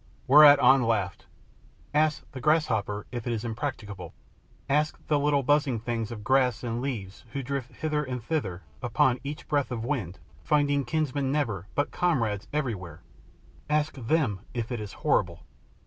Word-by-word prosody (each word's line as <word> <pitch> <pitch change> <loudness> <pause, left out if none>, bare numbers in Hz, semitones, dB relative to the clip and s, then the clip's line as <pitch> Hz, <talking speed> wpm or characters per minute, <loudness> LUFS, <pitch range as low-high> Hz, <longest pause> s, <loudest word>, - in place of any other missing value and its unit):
Whereat 145 +1 +9
An 135 0 +6
laughed. 105 -5 -1 0.7
"Ask 155 0 +2
the 130 - -8
grasshoppers 110 -9 +1
if 120 -1 -5
it 120 - 0
is 115 +1 -3
impracticable; 110 - -5 0.5
ask 150 +3 +1
the 150 -2 +2
little 145 -1 +2
buzzing 145 -3 +2
things 115 -1 -3
of 105 -3 -7
grass 125 -1 +2
and 120 0 -2
leaves 110 -8 -5
who 140 - -3
drift 135 -1 -4
hither 150 -1 -1
and 125 -4 -5
thither 100 - -2 0.2
upon 125 +1 +2
each 145 +2 -6
breath 145 -2 +1
of 115 -2 -4
wind, 110 - -2 0.3
finding 145 -2 +2
kinsmen 140 0 -1
never 110 - -1
but 145 - 0
comrades 115 - 0
everywhere 100 - -3 0.7
ask 150 0 +1
them 130 -5 0 0.2
if 115 0 -3
it 120 - -2
is 105 -2 -6
horrible." - - +1
130 Hz, 155 wpm, -27 LUFS, 110-145 Hz, 0.7 s, Whereat